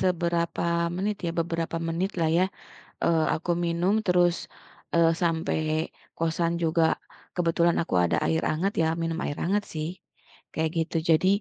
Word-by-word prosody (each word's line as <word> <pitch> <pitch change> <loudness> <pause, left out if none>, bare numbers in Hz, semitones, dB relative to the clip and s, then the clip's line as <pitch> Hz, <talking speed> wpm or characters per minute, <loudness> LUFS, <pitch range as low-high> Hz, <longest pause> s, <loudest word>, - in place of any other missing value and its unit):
seberapa 170 -2 0 0.3
menit 205 +2 -1
ya, - - 0
beberapa 165 0 -1
menit 180 +4 -1
lah 160 - +3
ya. 185 - +4 0.6
Eee, 160 -2 +3
aku 170 +2 -2
minum 170 +4 +1
terus, 175 -1 +4 0.6
eee, 165 -1 +5
sampai 165 -2 +1 0.6
kosan 165 +1 0
juga, 165 0 +3 0.5
kebetulan 170 -1 +2
aku 165 - -4
ada 85 - +2
air 160 - +1
hangat, 180 +6 0
ya - - +3 0.2
minum 165 0 -1
air 145 - -3
hangat 205 +4 +1
sih, 155 0 -2 0.7
kayak 160 0 0
gitu. 165 +1 -1
Jadi, 165 +3 +4
170 Hz, 145 wpm, -27 LUFS, 165-175 Hz, 0.7 s, eee